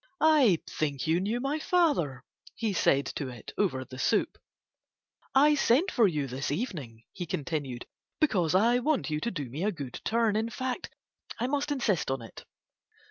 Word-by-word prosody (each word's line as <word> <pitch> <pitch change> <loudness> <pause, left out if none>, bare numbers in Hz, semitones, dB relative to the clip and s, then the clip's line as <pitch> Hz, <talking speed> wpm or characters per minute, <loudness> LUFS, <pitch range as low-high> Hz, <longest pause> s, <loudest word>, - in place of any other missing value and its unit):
"I 295 - +5
think 145 -4 -2
you 160 +2 +2
knew 210 +6 -1
my 275 +4 -1
father," 285 - +1 0.3
he 220 -3 -1
said 140 -5 +3
to 140 - -3
it 120 -3 -9
over 135 -11 0
the 130 0 -10
soup. - - +1 1.0
"I 295 +3 +6
sent 295 +6 +3
for 230 -4 +4
you 150 -6 -1
this 135 +1 -4
evening," 145 - -4
he 175 - -5
continued, 140 -5 -3 0.3
"because 185 - +2
I 235 +5 +4
want 275 - 0
you 150 - 0
to 235 - -1
do 150 - -4
me 140 +9 -5
a 210 - +2
good 140 - -7
turn; 225 -1 +2
in 220 +2 0
fact 255 +1 -4 0.5
I 240 - 0
must 285 +2 -1
insist 230 - 0
on 135 -3 -2
it." 115 - -11
190 Hz, 175 wpm, -29 LUFS, -, 1.0 s, I